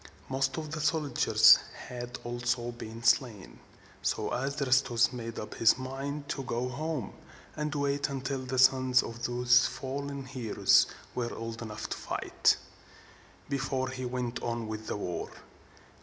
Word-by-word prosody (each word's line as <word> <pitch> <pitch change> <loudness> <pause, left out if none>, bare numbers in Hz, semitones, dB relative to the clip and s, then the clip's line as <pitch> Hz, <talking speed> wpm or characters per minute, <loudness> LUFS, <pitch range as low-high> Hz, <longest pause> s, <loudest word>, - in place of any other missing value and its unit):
Most 135 +1 0
of 155 -2 -5
the 160 -1 -3
soldiers 155 -3 +5 0.3
had 125 0 -6
also 120 0 -1
been 115 -1 -9
slain: 110 - +1 0.4
so - - -1
Adrastus 130 -2 +2
made 115 -2 -6
up 105 - -6
his 115 - +4
mind 135 +2 -5
to 135 - -2
go 125 -1 -2
home, 145 -3 -3 0.4
and 150 0 -2
wait 140 0 0
until 135 0 -3
the 130 0 -3
sons 130 0 +5
of 115 +1 -8
these 125 0 +4
fallen 140 0 -5
heroes 125 -4 +3 0.3
were 120 -1 -2
old 115 0 -6
enough 110 -2 -5
to - - -3
fight, - - +1 0.9
before 135 -1 -1
he 130 0 -5
went 125 -1 -3
on 115 -1 -3
with 110 0 -6
the - - -2
war. 90 -4 -4
125 Hz, 140 wpm, -30 LUFS, 120-135 Hz, 0.9 s, soldiers